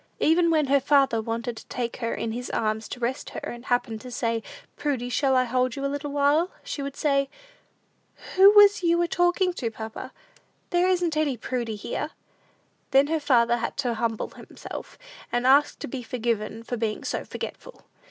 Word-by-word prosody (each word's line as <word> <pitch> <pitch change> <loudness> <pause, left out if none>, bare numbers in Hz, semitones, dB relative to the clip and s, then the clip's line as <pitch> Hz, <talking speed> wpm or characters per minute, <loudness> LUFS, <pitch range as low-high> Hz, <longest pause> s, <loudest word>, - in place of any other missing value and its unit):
Even 335 +2 +4
when 310 -2 +3
her 280 +1 +4
father 275 -4 +3
wanted 230 +1 -3
to - - -11
take 240 -2 -4
her 230 -2 -2
in 225 - -3
his 245 +2 -5
arms 220 0 -1
to - - -6
rest 245 +2 -2
her, - - -6
and 240 +1 -7
happened 240 -3 -1
to 255 - -9
say, 230 -1 -1 0.3
"Prudy, 260 -5 -2
shall 265 +2 +2
I 255 - +4
hold 255 0 0
you 275 - -3
a 275 - -1
little 285 0 -4
while?" 290 +5 +3
she 285 - -5
would 275 0 -5
say, 275 -2 +1 1.1
"Who 385 +1 +9
was 410 +1 +7
you 340 -1 +3
a - - 0
talkin' 355 +2 +2
to, 245 -9 -3
papa? 220 0 -7 0.6
There 350 0 +3
isn't 350 -3 +1
any 300 -5 +1
Prudy 235 -2 -3
here!" 255 +8 -4 0.8
Then 270 +1 +5
her 320 0 +1
father 240 -5 +3
had 230 -1 -4
to 250 -4 0
humble 225 -1 -2
himself, - - -10 0.3
and 245 +1 0
ask 280 +3 +5
to - - -6
be 255 +1 -5
forgiven 230 -2 -2
for 245 +1 -4
being 220 -2 -2
so - - -2
forgetful. - - -8
255 Hz, 190 wpm, -26 LUFS, 235-295 Hz, 1.1 s, Who